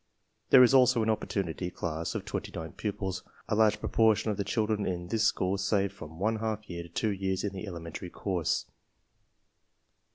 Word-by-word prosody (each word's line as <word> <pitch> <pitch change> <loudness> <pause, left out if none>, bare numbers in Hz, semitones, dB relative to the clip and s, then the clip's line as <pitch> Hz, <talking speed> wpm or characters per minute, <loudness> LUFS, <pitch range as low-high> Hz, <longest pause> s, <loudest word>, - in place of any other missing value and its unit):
There 130 -2 +9
is 125 - +5
also 125 -3 +5
an 110 - +2
opportunity 95 -4 -2
class 85 -2 -4
of - - -3
29 80 0 -5
pupils. 95 -3 -3 0.3
A - - -1
large 110 0 +4
propor 110 -1 +3
tion 110 - -1
of 100 - -3
the 100 - 0
children 105 0 0
in 90 -2 -3
this 110 +1 +1
school 95 -1 +1
save 100 0 +1
from 80 -4 -10
one 110 +5 +1
half 110 -1 -3
year 85 -1 -5
to 85 - -10
two 105 +6 0
years 95 -1 -1
in 100 -1 -2
the 95 +2 -6
elementary 85 0 -6
course. 90 -3 -1
100 Hz, 185 wpm, -29 LUFS, 90-110 Hz, 0.3 s, There